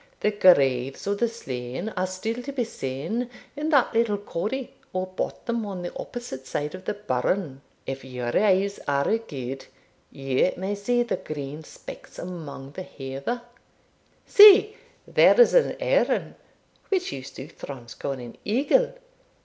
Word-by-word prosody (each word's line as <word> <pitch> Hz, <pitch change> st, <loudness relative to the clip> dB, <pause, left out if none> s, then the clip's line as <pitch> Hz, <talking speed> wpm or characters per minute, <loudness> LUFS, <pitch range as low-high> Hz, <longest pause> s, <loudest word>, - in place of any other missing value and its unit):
The 210 Hz, -, +3 dB
graves 135 Hz, -10 st, +4 dB
of 200 Hz, 0 st, -1 dB
the 235 Hz, -, +2 dB
slain 130 Hz, -, -5 dB
are 185 Hz, -3 st, -2 dB
still 220 Hz, +6 st, -3 dB
to 275 Hz, +3 st, -6 dB
be 265 Hz, -3 st, -1 dB
seen 195 Hz, -, -3 dB, 0.3 s
in 300 Hz, +2 st, -2 dB
that 280 Hz, -7 st, +4 dB
little 225 Hz, -2 st, +2 dB
corrie, 210 Hz, +6 st, -4 dB, 0.2 s
or 185 Hz, 0 st, -1 dB
bottom, 225 Hz, +5 st, -3 dB
on 185 Hz, -3 st, -5 dB
the 175 Hz, -, -6 dB
opposite 135 Hz, -, -7 dB
side 150 Hz, +1 st, -3 dB
of 185 Hz, 0 st, -9 dB
the -, -, -2 dB
burn; 165 Hz, -5 st, -1 dB, 0.2 s
if 135 Hz, 0 st, -5 dB
your 125 Hz, -2 st, -4 dB
eyes 200 Hz, -1 st, +3 dB
are 140 Hz, +8 st, +2 dB
good, 135 Hz, -, -6 dB, 0.4 s
you 135 Hz, +5 st, +1 dB
may 190 Hz, +3 st, -2 dB
see 240 Hz, +4 st, +1 dB
the 240 Hz, -, -2 dB
green 145 Hz, 0 st, -6 dB
specks -, -, -11 dB
among 155 Hz, -6 st, -7 dB
the 185 Hz, -, -7 dB
heather. 140 Hz, -, -5 dB, 0.8 s
See, 420 Hz, +1 st, +9 dB, 0.3 s
there -, -, +5 dB
is 485 Hz, -, +7 dB
an -, -, +4 dB
earn, -, -, +1 dB, 0.6 s
which 370 Hz, -2 st, 0 dB
you 135 Hz, -, -5 dB
Southrons 130 Hz, -2 st, -9 dB
call 140 Hz, -, -3 dB
an 125 Hz, -3 st, -9 dB
eagle. 290 Hz, -, +2 dB
185 Hz, 150 wpm, -25 LUFS, -, 0.8 s, See